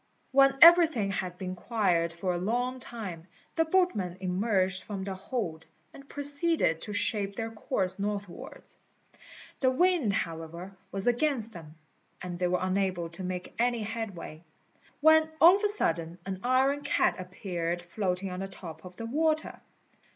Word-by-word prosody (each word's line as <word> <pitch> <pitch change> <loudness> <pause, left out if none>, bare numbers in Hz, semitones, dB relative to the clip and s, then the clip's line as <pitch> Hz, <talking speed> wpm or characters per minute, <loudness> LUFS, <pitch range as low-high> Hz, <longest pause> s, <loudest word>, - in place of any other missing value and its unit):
When 275 0 +5
everything 325 - +7
had 185 -2 -4
been 185 -1 -5
quiet 175 -5 0
for 180 +2 -2
a 175 - -2
long 245 +6 -1
time, 195 -9 -7 0.3
the 325 - +2
boatmen 315 - +1
emerged 190 0 +1
from 200 -3 -6
the 195 0 -4
hold, 185 -5 -4 0.3
and 275 0 -14
proceeded 285 - +1
to 210 - -6
shape 205 -1 0
their 225 +2 -4
course 195 -3 -2
northwards. 200 -2 -6 0.8
The 260 - +3
wind, 325 - +2
however, 170 +1 -4 0.2
was 195 0 -3
against 245 -2 +1
them, 160 -3 -11 0.4
and 175 -1 -6
they 180 - +1
were 180 +1 +1
unable 185 -2 -1
to 170 +3 -9
make 180 0 -5
any 240 -1 +1
headway; 200 -7 -6 0.6
when 315 +1 +6
all 350 +4 +8
of 410 - -9
a - - +5
sudden 170 - -1
an 190 -1 -4
iron 265 +3 +2
cat 285 - +1
appeared 175 -2 -4
floating 185 +1 -2
on 180 - -5
the 195 - -3
top 165 -4 -10
of 180 -1 -11
the 230 - -6
water. 310 +5 0
195 Hz, 155 wpm, -29 LUFS, 180-255 Hz, 0.8 s, all